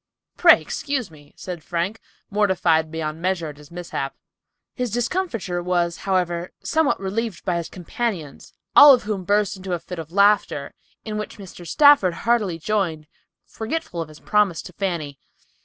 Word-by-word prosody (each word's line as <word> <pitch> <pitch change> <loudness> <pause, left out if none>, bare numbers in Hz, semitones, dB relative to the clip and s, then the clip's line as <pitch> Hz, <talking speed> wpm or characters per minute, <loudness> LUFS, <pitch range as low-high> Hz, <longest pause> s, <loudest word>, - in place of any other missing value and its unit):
"Pray - - +7
excuse 275 - -3
me," 145 -1 -17
said 175 -4 -7
Frank, 175 +7 -2 0.3
mortified 180 -6 +2
beyond 160 0 -4
measure 175 -3 -1
at 145 - -11
his 150 0 -15
mishap. 170 -6 -5 0.6
His 250 -2 -2
discomfiture 230 - -2
was, 175 -1 0
however, 175 -2 0
somewhat 315 -3 +1
relieved 205 +2 -3
by 180 -3 0
his 170 - -4
companions, 180 - -4 0.2
all 290 -1 +10
of 245 - -6
whom 205 -3 -3
burst 205 +1 +1
into 185 -1 -5
a 175 - -1
fit 175 +1 -8
of 160 0 -8
laughter, 200 +2 +2 0.3
in 215 -1 -3
which 210 - -6
Mr. 180 -3 -11
Stafford 285 - +5
heartily 215 -7 +1
joined, 165 -4 -1 0.4
forgetful 225 - -4
of 160 - -6
his 155 - -14
promise 210 -6 +1
to 180 - -11
Fanny. 165 -8 -3
185 Hz, 155 wpm, -23 LUFS, 170-215 Hz, 0.6 s, all